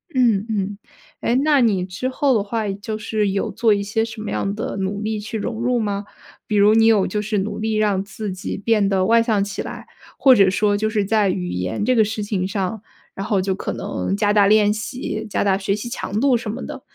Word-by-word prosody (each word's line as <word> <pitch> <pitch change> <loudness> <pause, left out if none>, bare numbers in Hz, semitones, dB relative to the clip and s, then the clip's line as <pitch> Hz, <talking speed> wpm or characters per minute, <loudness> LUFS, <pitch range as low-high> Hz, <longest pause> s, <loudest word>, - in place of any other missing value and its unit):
嗯， 230 -6 +3
嗯， 200 -1 -2 0.4
哎， 235 - +1
那 295 -3 +4
你 200 -6 +2
之 190 +8 -4
后 265 0 +1
的 205 - +1
话， 220 0 -2
就 205 +2 -5
是 215 -1 -1
有 195 0 -1
做 225 -2 +2
一 200 0 -1
些 225 +2 0
什 225 0 -6
么 215 - -5
样 200 +1 -2
的 220 - -4
努 195 +2 -2
力 215 0 -2
去 220 +2 -5
融 225 +1 -4
入 245 0 +1
吗？ 205 -1 -2 0.4
比 210 - -1
如 205 +1 +5
你 225 0 +5
有 210 -4 +4
就 210 +2 -2
是 210 0 -2
努 205 +2 -2
力 220 0 -1
让 205 -3 +1
自 210 0 -6
己 185 - -5
变 205 -1 +2
得 190 -1 +2
外 230 +1 +5
向 215 -4 +1
起 200 - -4
来， - - -7 0.3
或 265 -2 +6
者 195 -4 +5
说 205 +1 +1
就 215 +1 0
是 210 -2 0
在 210 -1 +2
语 180 -1 -2
言 90 - -2
这 255 +1 +3
个 220 - +5
事 215 0 -3
情 195 -3 -1
上， 195 +2 -3 0.3
然 195 - -5
后 205 -4 +2
就 190 +1 0
可 185 - -4
能 90 +2 -3
加 205 - +2
大 205 -2 +5
练 210 0 +4
习， 220 +1 -5
加 - - 0
大 195 -1 +3
学 195 0 0
习 210 +3 -6
强 210 -3 -3
度 265 0 +3
什 230 -2 -3
么 235 +5 -5
的？ - - -7
210 Hz, 260 characters per minute, -21 LUFS, 195-225 Hz, 0.4 s, 或